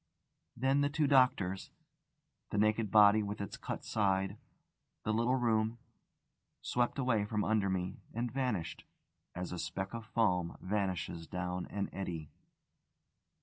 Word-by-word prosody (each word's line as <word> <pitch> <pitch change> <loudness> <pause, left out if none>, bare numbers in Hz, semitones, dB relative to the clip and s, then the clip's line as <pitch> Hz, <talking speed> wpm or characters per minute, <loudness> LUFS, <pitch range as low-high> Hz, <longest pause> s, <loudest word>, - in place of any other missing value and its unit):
Then 135 +3 +3
the 145 - +2
two 150 +1 +1
doctors, 125 -9 +3 0.8
the - - -2
naked 110 +1 +2
body 105 +1 +7
with 105 0 -4
its 100 - -4
cut - - -5
side, 95 -1 +1 0.6
the 110 - 0
little 115 +3 +2
room, 115 -2 +1 0.9
swept 120 -1 0
away 125 -6 +2
from 105 0 -1
under 105 -3 +2
me 90 -1 -2
and 120 +1 -2
vanished, 120 -11 -2 0.5
as 90 0 -4
a 90 - -4
speck 95 +5 -4
of 115 -2 -6
foam 90 -7 +1
vanishes 90 -4 -2
down 90 0 -3
an 100 -1 -2
eddy. 85 -6 -5
105 Hz, 135 wpm, -34 LUFS, 95-115 Hz, 0.9 s, body